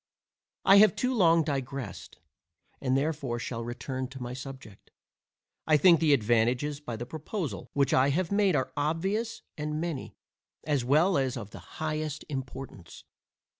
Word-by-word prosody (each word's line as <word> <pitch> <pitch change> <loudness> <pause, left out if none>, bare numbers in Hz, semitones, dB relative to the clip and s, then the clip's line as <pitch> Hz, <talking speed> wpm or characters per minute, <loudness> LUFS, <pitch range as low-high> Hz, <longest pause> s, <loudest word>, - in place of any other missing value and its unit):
I 195 - +8
have 205 -3 +7
too 255 +1 0
long 170 -7 +4
digressed, 135 -3 -5 0.6
and 130 0 +1
therefore 140 -4 -1
shall 115 0 -4
return 130 +2 -4
to 135 +1 -10
my 125 0 -5
subject. 130 -5 -10 0.8
I 155 -1 +5
think 170 0 +6
the 160 -2 +3
advantages 120 +4 +2
by 120 -6 -6
the 120 +2 -5
proposal 155 - -5
which 140 -2 +2
I 130 +2 +4
have 170 +5 0
made 200 -4 +3
are 130 - -1
obvious 190 +10 -1 0.2
and 150 +1 -2
many, 165 -5 -4 0.5
as 145 -5 0
well 155 +7 +3
as 130 -1 -1
of 105 -3 -7
the - - -9 0.2
highest 155 -1 -3
importance. 130 - -7
140 Hz, 150 wpm, -29 LUFS, 130-160 Hz, 0.8 s, I